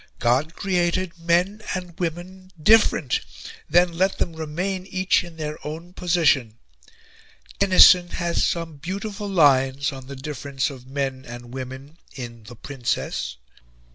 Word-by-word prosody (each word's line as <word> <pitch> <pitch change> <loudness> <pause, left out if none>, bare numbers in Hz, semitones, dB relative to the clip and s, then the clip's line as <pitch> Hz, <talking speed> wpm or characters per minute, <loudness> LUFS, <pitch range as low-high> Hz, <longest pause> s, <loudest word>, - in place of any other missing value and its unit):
God 130 +7 +1
created 180 -2 -1
men 175 +5 +1
and 180 -2 -6
women 180 +2 -5
different 160 - +4 0.5
then 175 +1 +4
let 190 +3 +1
them 170 - -1
remain 180 +5 -3
each 185 -1 +1
in 170 -2 -12
their 150 -1 -5
own 165 +4 -7
position. 150 -11 +2 1.0
Tennyson 185 -2 +7
has 170 -1 -1
some 165 -3 -2
beautiful 200 +6 -5
lines 140 -6 +3
on 135 -1 -10
the 140 - -7
difference 140 0 -3
of 130 -2 -12
men 135 -1 -3
and 120 0 -9
women 130 +4 -8 0.2
in 115 -4 -8
'The 120 +3 -11
Princess.' 125 - -3
165 Hz, 130 wpm, -23 LUFS, 135-180 Hz, 1.0 s, Tennyson